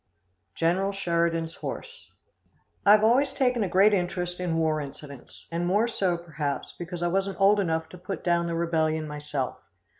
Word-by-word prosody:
General 185 +4 +1
Sheridan's 170 -3 0
Horse. 485 0 -7 0.8
I - - +9
have 215 0 +5
always 255 +5 +3
taken 250 -4 +1
a 190 - -2
great 195 +4 +5
interest 180 -1 -1
in 175 -3 -1
war 155 -1 +1
incidents, 140 -1 -10
and 170 +1 -1
more 205 +6 +3
so, 190 -6 0
perhaps, 155 -4 -4
because 175 0 -5
I - - +2
wasn't 195 +2 -1
old 200 +1 +5
enough 160 -4 0
to 180 - -12
put 185 +2 -6
down 170 -1 +2
the 170 - -2
rebellion 160 -2 0
myself. 150 -3 -4
175 Hz, 170 wpm, -27 LUFS, 160-195 Hz, 0.8 s, I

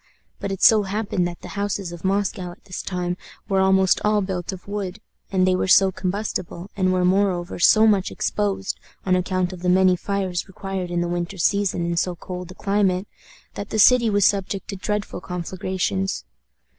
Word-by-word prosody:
But 200 - -3
it 195 - -4
so 220 -1 +7
happened 200 -2 -1
that 175 0 -8
the - - -9
houses 200 -2 -3
of 175 -1 -9
Moscow 195 -1 0
at - - -22
this 185 -2 -5
time 180 -1 -3 0.3
were 195 -2 +1
almost 190 -1 +4
all 210 0 +3
built 185 -2 -3
of 190 0 -10
wood, 200 -1 -4 0.3
and 185 -2 +3
they 185 0 +3
were 185 - 0
so 190 0 +6
combustible, 185 -1 -4
and 185 -2 +2
were, 180 -1 +2
moreover, 185 -2 +1
so 215 +5 +6
much 200 -4 +3
exposed, 200 -2 -2 0.3
on 185 -1 +3
account 185 0 0
of 180 - -9
the 180 - 0
many 185 0 +5
fires 190 -1 -2
required 190 -1 -5
in 175 0 -1
the 175 - -1
winter 175 +2 -3
season 185 0 +1
in 170 0 -1
so 180 +1 0
cold 180 +1 -7
a 185 - -10
climate, 195 -1 +1 0.5
that 200 - -6
the - - -2
city 235 +2 +6
was 205 -2 +3
subject 195 0 0
to 200 - -3
dreadful 205 0 -3
conflagrations. 185 +2 -2
190 Hz, 190 wpm, -23 LUFS, 180-200 Hz, 0.5 s, so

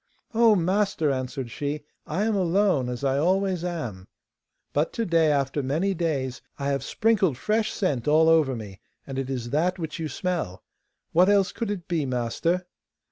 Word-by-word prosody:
'Oh, 225 -1 +5
master!' 185 -3 +1
answered 130 -2 -3
she, 145 +3 -3 0.2
'I 175 +7 -1
am 220 -1 +1
alone, 185 -7 +2
as 125 +2 -5
I 135 0 +2
always 185 +2 +1
am! 125 - -4 0.7
But 150 +3 +1
to 230 - -1
day, 165 -4 +3
after 140 0 0
many 160 +9 0
days, 145 -7 -2 0.2
I 140 0 -2
have 140 -1 -1
sprinkled 205 - +2
fresh 215 +8 0
scent 145 - -1
all 155 +2 +5
over 155 -5 +4
me, 100 -4 -8 0.3
and 135 -1 -4
it 135 -1 -3
is 120 -3 -4
that 175 +5 +1
which 160 -1 -5
you 160 - -2
smell. 165 - -3 0.5
What 180 +4 +5
else 200 -2 +4
could 230 - -4
it 195 -5 -4
be, 160 -5 0
master? 130 +9 -1
160 Hz, 175 wpm, -25 LUFS, 135-185 Hz, 0.7 s, Oh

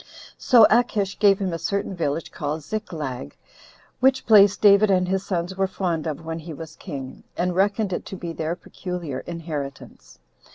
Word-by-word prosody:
So 235 -4 +7
Achish 215 -4 +1
gave 200 -2 +5
him 190 -3 -2
a 165 - -3
certain 200 +1 -2
village 160 -1 -2
called 150 +1 -4
Ziklag; 150 - -5 0.6
which 260 0 +3
place 205 -3 +6
David 205 0 +6
and 180 -2 +3
his 190 +1 0
sons 180 -1 -3
were 195 0 +1
fond 175 -4 -2
of 155 +1 -5
when 165 0 -4
he 160 -1 -8
was 160 +1 -9
king, 135 -2 -8
and 180 0 0
reckoned 200 +1 +1
it - - -3
to - - -6
be 170 -2 -6
their 160 +1 -2
peculiar 175 -7 -6
inheritance. 150 - -7
180 Hz, 170 wpm, -23 LUFS, 160-200 Hz, 0.6 s, So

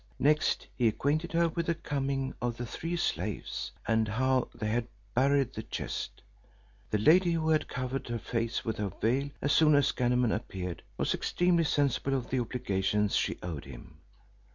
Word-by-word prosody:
Next 150 +2 +2
he 120 -2 +3
acquainted 150 +9 0
her 170 0 +3
with 170 +1 -3
the 170 - +2
coming 135 -3 -2
of 120 -1 -1
the 120 - -3
three 165 +8 -4
slaves, 175 - -2 0.2
and 110 -1 +2
how 130 +4 +1
they 110 - -4
had 120 +1 0 0.3
buried 135 0 +3
the 110 - -4
chest. - - -5 0.7
The 105 - +1
lady, 170 - +5
who 160 -1 0
had 155 -1 +2
covered 130 +1 -3
her 120 0 -2
face 115 +1 -2
with 110 - -2
her 105 -1 -1
veil 135 +5 +1
as 145 - +2
soon 155 -2 +6
as 145 - +4
Ganem 125 -2 +2
appeared, 90 -2 -4 0.2
was - - +1
extremely 175 -2 +2
sensible 140 -2 +1
of 125 -2 -3
the 130 - +2
obligations 105 -4 0
she - - +1
owed 80 -5 -5
him. 70 +3 -12
130 Hz, 175 wpm, -30 LUFS, 115-150 Hz, 0.7 s, soon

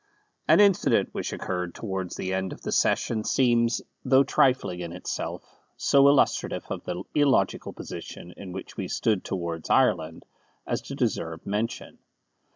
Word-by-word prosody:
An 160 +4 +6
incident 200 -3 +4
which - - -4
occurred 90 -1 -4
towards 95 -4 -4
the 95 - -3
end 95 0 -2
of - - -12
the - - -3
session 110 -2 +1
seems, 120 -2 +2 0.2
though 130 +1 +5
trifling 130 -9 +2
in 85 -1 -5
itself, 90 - -4 0.3
so 140 0 +5
illustrative 140 -1 +2
of - - -4
the 90 +1 -4
illogical 145 -3 +2
position 90 - -9
in 95 -2 -9
which 95 +1 -8
we - - -3
stood 105 -5 0
towards 85 -3 -4
Ireland, 80 0 +2 0.4
as - - -2
to - - -7
deserve 80 0 -2
mention. 105 +3 -3
95 Hz, 150 wpm, -26 LUFS, 90-130 Hz, 0.4 s, An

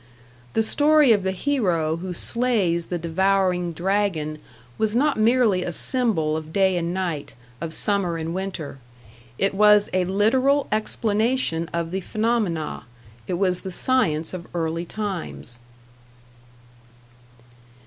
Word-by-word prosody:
The 225 - +3
story 295 +2 +5
of 210 -3 +4
the 190 - -1
hero 180 - 0
who 185 +2 -5
slays 195 -4 0
the 175 - -2
devouring 180 +1 +1
dragon 170 -4 -1 0.4
was 220 0 +1
not 290 +4 +2
merely 225 -4 +3
a 180 - -3
symbol 185 -8 +1
of 155 0 -5
day 190 0 +2
and 170 -1 -1
night, 175 -6 -3 0.3
of 165 -1 -4
summer 190 -2 -1
and 165 +1 -4
winter; 185 -7 -5 0.6
it 195 +1 +1
was 210 +1 +5
a 185 -1 +2
literal 255 +9 +2
explanation 215 -4 0
of 170 -1 -3
the 190 +1 -2
phenomena, 215 - -1 0.4
it 180 - -1
was 180 -1 +1
the 190 - -6
science 185 -7 +1
of 175 -2 -7
early 165 0 -2
times. 185 - -4
190 Hz, 130 wpm, -23 LUFS, 170-215 Hz, 0.6 s, story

